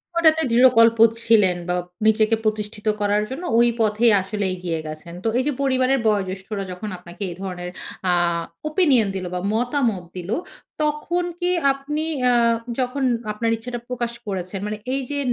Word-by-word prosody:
ওটাতে 320 -1 +5
দৃঢ়কল্প 230 -2 +6 0.3
ছিলেন 205 -6 +4
বা 180 - +1 0.3
নিজেকে 220 +1 +4
প্রতিষ্ঠিত 215 0 -3
করার 205 +1 +2
জন্য 275 +7 -6 0.2
ওই 240 - +5
পথেই 220 +2 +4
আসলে 200 +1 -3
এগিয়ে 175 -3 -3
গেছেন। 155 +2 -8
তো - - 0
এই 255 - +2
যে - - +2
পরিবারের 260 0 +2
বয়োজ্যেষ্ঠরা 195 0 -1
যখন 205 +4 -6
আপনাকে 180 +3 -9
এ - - -5
ধরনের 180 -2 -5 0.4
আ - - +4 0.6
opinion 285 - +3
দিলো 185 -1 -3
বা - - -1
মতামত 240 -5 0
দিলো, 185 +5 -3 0.5
তখন 305 +4 0 0.2
কি 355 0 0 0.2
আপনি 295 +3 -4 0.3
আ - - +3 0.5
যখন 255 +2 -1 0.3
আপনার 225 +2 -1
ইচ্ছাটা 240 +1 -6
প্রকাশ 240 -1 -2 0.2
করেছেন 190 0 -4
মানে 210 0 -3 0.2
এই 275 - 0
যে 285 - -1
220 Hz, 155 wpm, -22 LUFS, 195-260 Hz, 0.6 s, দৃঢ়কল্প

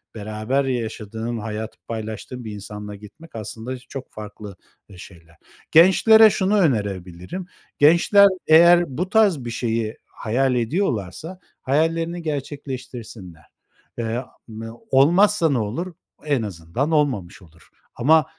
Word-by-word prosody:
beraber 110 +6 -2
yaşadığın, 115 -2 -4
hayatı 110 0 -6
paylaştığın 110 +3 -6
bir 110 - -6
insanla 105 0 -8
gitmek 105 +11 -15
aslında 110 +3 -6
çok 130 +1 -9
farklı, 105 -1 -9 0.3
eee, 95 - -14
şeyler. 85 -3 -14 0.4
Gençlere 215 +6 +7
şunu 200 +1 +1
önerebilirim, 100 - -2 0.3
gençler 170 +7 +6 0.2
eğer 170 +2 +7
bu 180 +3 -2
tarz 200 - +3
bir - - -4
şeyi 115 -2 -2
hayal 125 +4 -1
ediyorlarsa 125 - -2 0.2
hayallerini 165 +5 0
gerçekleştirsinler. 125 - -7 0.5
Eee, 115 +1 -2 0.3
m 110 0 -8 0.2
olmazsa 170 +6 +4
ne 140 - +1
olur? 125 - -4 0.3
En 145 -5 +1
azından 100 - -3
olmamış 125 - 0
olur. 80 -2 -20 0.3
Ama 155 +5 +4
125 Hz, 115 wpm, -22 LUFS, 105-160 Hz, 0.5 s, Gençlere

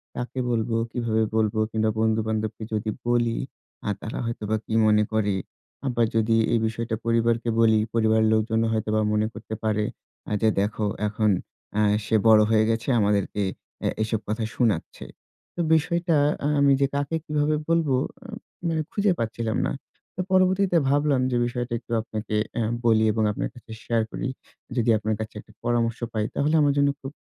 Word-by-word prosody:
কাকে 125 +2 -4
বলবো, 115 -1 0 0.2
কিভাবে 110 -2 0
বলব 110 0 +1 0.2
কিংবা 110 0 +1
বন্ধুবান্ধবকে 110 0 0
যদি 110 0 -1 0.2
বলি 120 -1 +2 0.5
আ - - +1
তারা 110 - -5
হয়তোবা 110 -2 -2
কি - - -5
মনে 105 0 +4
করে। 105 -2 +1 0.5
আবার 120 -2 +2
যদি 115 0 +3 0.2
এই 115 - +3
বিষয়টা 115 +1 -3
পরিবারকে 115 0 +1
বলি 110 -1 +5 0.2
পরিবারের 110 -1 +3
লোকজনও 110 +1 +1
হয়তোবা 110 0 0
মনে 105 0 +2
করতে 110 -1 -7
পারে 105 -1 +1 0.5
আ - - -6
যে, 110 - +4
"দেখো 105 +1 -1 0.2
এখন 105 +1 +1 0.5
আ - - +4 0.2
সে - - +1
বড় 110 -1 +8
হয়ে 110 -1 +4
গেছে, 115 +1 -1
আমাদেরকে 105 0 +1 0.4
এ - - +3 0.2
এসব 110 0 -1
কথা 110 +2 -2
শুনাচ্ছে।" 110 -9 -1 0.5
তো 175 - -1
বিষয়টা 170 +1 +1 0.4
আমি 140 0 +5
যে 140 - +4
কাকে 145 +3 -1
কিভাবে 150 0 +1
বলবো 165 -5 +2 0.7
মানে 160 -1 0
খুঁজে 205 -1 +2
পাচ্ছিলাম 115 0 -2
না। - - -1 0.4
তো 185 - -2
পরবর্তীতে 185 -1 +3
ভাবলাম 145 -1 +2
যে 120 - +1
বিষয়টা 120 0 -3
একটু - - -17
আপনাকে 110 -1 -5 0.2
এ - - +1 0.2
বলি 110 -1 +4
এবং 110 +1 0
আপনার - - -3
কাছে 120 -2 -14
শেয়ার 115 -1 +1
করি। - - -3 0.5
যদি 120 -1 +2
আপনার 110 +1 -1
কাছে 110 0 -6
একটা 110 - -15
পরামর্শ 120 -1 0
পাই 110 -1 0
তাহলে 150 +3 +2
আমার 145 -1 +3
জন্য 140 0 +4
খুব 135 - -6
115 Hz, 165 wpm, -25 LUFS, 110-125 Hz, 0.7 s, বড়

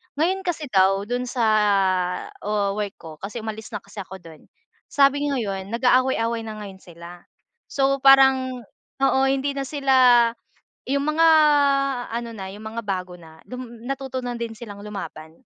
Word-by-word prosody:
Ngayon 360 +5 -1
kasi 320 -3 -2
daw 195 0 +3
do'n 245 +3 -3
sa 240 -1 -2 1.0
wo 205 -1 -1
work 205 -2 -3
ko 160 -2 -12
kasi 215 +3 -7
umalis 220 0 -6
na 205 - -6
kasi 210 - -11
ako 190 0 -8
do'n. 160 -2 -15 0.4
Sabi 285 +1 +2
ngayon 205 -5 -3
nag-aaway-away 235 -2 +1
na 215 - -6
ngayon 190 -1 -10
sila. 175 0 -12 0.5
So, 275 0 +1
parang 265 -2 +5 0.4
oo 265 0 +3
hindi 275 +1 0
na 275 -1 -4
sila 275 -2 +1 0.9
yung 280 +2 -1
mga 330 +1 +4 0.8
ano 235 0 -4
na, 190 -2 -7
yung 210 +2 -10
mga 230 - -4
bago 185 -3 -4
na 160 -2 -15
dum 240 -2 -9
natuto 270 -1 -4
na 245 -1 -4
din 235 -1 -4
silang 210 -3 -10
lumaban, 165 -6 -8
235 Hz, 155 wpm, -23 LUFS, 195-270 Hz, 1.0 s, parang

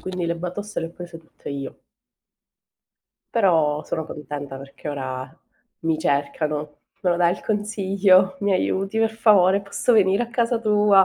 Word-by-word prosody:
quindi 185 -1 -4
le 170 0 -1
batoste 180 +5 -5
le 165 - -3
ho - - -10
prese 170 -1 -10
tutte 160 -2 -11
io. 140 -1 -6 1.6
Però 160 -9 +3
sono 160 -1 -4
contenta 145 -2 -7
perché 140 +2 -10
ora 130 +1 -5 0.4
mi 160 -1 0
cercano. 150 0 -1 0.2
"Me 180 - +1
lo 175 - +2
dai 175 0 +3
il - - -8
consiglio? 195 -3 +2
Mi 200 -1 +1
aiuti, 195 +2 0
per 225 0 +2
favore? 200 -4 +4
posso 200 +5 0
venire 200 0 +4
a 235 - -5
casa 235 -1 +1
tua?" 210 -3 +5
180 Hz, 160 wpm, -23 LUFS, 150-205 Hz, 1.6 s, tua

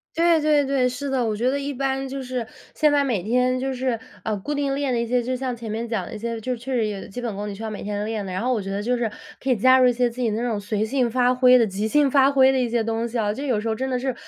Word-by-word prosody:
对 335 -1 +4
对 300 -1 +4
对， 270 -2 +2
是 265 +3 -5
的。 260 -3 0
我 220 -1 0
觉 240 +4 +1
得 280 - -1
一 280 0 -3
般 270 0 -2
就 270 0 -5
是 250 -2 -4 0.3
现 300 -1 +3
在 290 -1 +4
每 235 -10 -1
天 250 +4 +1
就 265 +1 -2
是， 250 -2 -1 0.3
呃， 215 -2 -1
固 290 +10 -4
定 280 -1 0
练 280 -2 -1
的 235 - +1
一 235 - -1
些， 245 +1 +1
就 255 +2 -2
像 255 -1 -3
前 225 -2 -7
面 230 +2 -3
讲 220 -5 -2
的 - - -8
一 215 - -6
些， 230 +1 -4
就 255 +3 -3
是 245 - -3
确 255 +3 -8
实 225 -3 +1
有 200 -2 -5
基 195 - -9
本 225 -4 -3
功 205 +1 -4
你 200 - -5
需 210 - -9
要 220 - -4
每 210 - -6
天 205 0 -3
练 215 -2 -3
的。 185 - -6
然 185 +1 -3
后 255 +2 +1
我 230 - 0
觉 195 0 -6
得 200 +1 -2
就 250 +3 0
是 235 -3 -1 0.3
可 270 - -4
以 250 - +3
加 260 +5 +5
入 255 -1 +5
一 - - +3
些 245 0 +1
自 250 +2 -9
己 240 - +1
那 220 +2 -1
种 215 -4 -1
随 210 +1 -1
性 245 0 0
发 250 +1 +2
挥 250 0 +6
的、 230 - +4
即 205 +2 -2
兴 290 +2 +3
发 275 0 +5
挥 265 -1 +5
的 265 - +1
一 245 -2 +1
些 230 -1 0
东 225 +1 -1
西 235 +1 -4
啊， 210 -1 +1
就 265 - -6
有 240 -5 +1
时 210 - -4
候 220 - 0
真 260 +4 -3
的 255 -1 0
是 260 0 -2
245 Hz, 365 characters per minute, -23 LUFS, 220-265 Hz, 0.3 s, 挥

